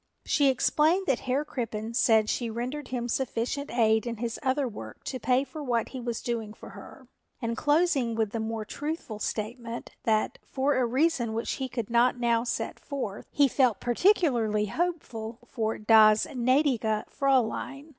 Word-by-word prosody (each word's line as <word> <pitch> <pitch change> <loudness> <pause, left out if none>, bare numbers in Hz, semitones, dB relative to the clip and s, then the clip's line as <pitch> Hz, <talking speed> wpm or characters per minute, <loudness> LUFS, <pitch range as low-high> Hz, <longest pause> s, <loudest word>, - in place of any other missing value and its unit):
She 285 -2 +3
explained 310 +8 +2
that 270 -8 +1
Herr 275 +4 +1
Crippen 230 -5 -4
said 220 -2 +4
she 235 +1 -1
rendered 250 +5 -4
him 240 -2 -3
sufficient 250 +3 -2
aid 220 0 +2
in 235 -1 -3
his 230 0 -4
other 265 0 +1
work 110 - -9
to 255 - -4
pay 250 +3 +2
for 300 +2 -8
what 240 -4 0
he 260 - -6
was 235 -1 -4
doing 225 -3 -3
for - - -11
her, - - -12 0.3
and 230 -2 -2
closing 290 -6 +2
with 220 -2 0
the 230 - -3
more 220 0 -3
truthful 290 -3 -5
statement 230 +2 -4
that, 215 -1 0
for 275 +2 0
a 255 -2 +2
reason 255 -3 +1
which 230 - -2
he 260 - -2
could 235 -2 -4
not 245 +1 +3
now 235 -1 +2
set 240 - -3
forth, 255 -9 -5
he 285 -1 +4
felt 250 -5 +2
particularly 240 - +2
hopeful 235 - -3
for 225 -3 -2
das 215 0 +6
gnädige 250 -4 +1
Fräulein. 275 +2 0
240 Hz, 165 wpm, -28 LUFS, 225-275 Hz, 0.3 s, das